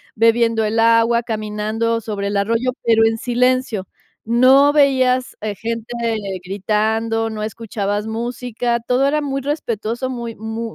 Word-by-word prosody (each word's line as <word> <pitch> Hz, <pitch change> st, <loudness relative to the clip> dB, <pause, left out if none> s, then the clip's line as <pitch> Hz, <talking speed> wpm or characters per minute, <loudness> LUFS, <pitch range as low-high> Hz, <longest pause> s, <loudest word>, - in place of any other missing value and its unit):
bebiendo 230 Hz, 0 st, +3 dB
el 220 Hz, +2 st, 0 dB
agua, 230 Hz, +1 st, +4 dB
caminando 220 Hz, +1 st, -2 dB
sobre 205 Hz, -2 st, -4 dB
el 205 Hz, -, -2 dB
arroyo, 230 Hz, +5 st, +1 dB
pero 225 Hz, -1 st, +4 dB
en 225 Hz, 0 st, +1 dB
silencio. 245 Hz, -4 st, 0 dB, 0.4 s
No 260 Hz, +5 st, +5 dB
veías, 260 Hz, -3 st, +2 dB
eh, 210 Hz, -1 st, -4 dB
gente 230 Hz, +2 st, -5 dB, 0.5 s
gritando, 220 Hz, +3 st, -1 dB
no 215 Hz, -1 st, -5 dB
escuchabas 210 Hz, -1 st, -3 dB
música, 235 Hz, +1 st, -2 dB
todo 255 Hz, +3 st, +2 dB
era 300 Hz, +2 st, +1 dB
muy 275 Hz, -1 st, -2 dB
respetuoso, 250 Hz, -3 st, -3 dB
muy 235 Hz, -3 st, -5 dB
muy 220 Hz, +1 st, -5 dB
230 Hz, 135 wpm, -19 LUFS, 220-245 Hz, 0.5 s, No